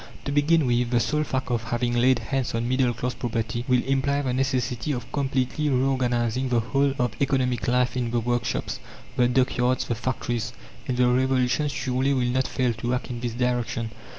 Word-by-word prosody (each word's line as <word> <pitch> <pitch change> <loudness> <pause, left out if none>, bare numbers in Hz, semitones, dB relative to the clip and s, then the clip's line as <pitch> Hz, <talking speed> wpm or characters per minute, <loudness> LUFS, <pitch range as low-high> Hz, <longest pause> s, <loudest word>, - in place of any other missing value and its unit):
To 140 - -2
begin 150 +2 +3
with, 120 -1 +1
the 120 -1 +2
sole 150 +5 +1
fact 130 -3 -2
of 115 -1 -1
having 120 +1 -1
laid 125 +1 +4
hands 125 +2 -2
on 115 +1 -1
middle 130 0 +2
class 125 +2 -3
property 115 0 -3
will 125 -2 +3
imply 140 +1 +1
the 130 -2 -1
necessity 130 0 -1
of 120 -1 -6
completely 135 +1 0
reorganizing 125 -2 +1
the 120 -1 +3
whole 135 +4 +1
of 125 -2 +1
economic 130 -3 +1
life 125 +1 +2
in 125 -2 -1
the 120 0 0
workshops, 120 +1 -1 0.4
the 125 - +4
dockyards, 125 0 +1
the - - -1
factories. 120 -1 -3 0.3
And 125 - -1
the 125 0 +4
revolution 130 +2 +2
surely 130 0 0
will 125 -2 +1
not 130 +1 +1
fail 125 -2 0
to 120 +2 -2
act 125 0 -4
in 120 - -4
this 120 -1 -3
direction. 120 -2 -1
125 Hz, 190 wpm, -25 LUFS, 120-130 Hz, 0.4 s, laid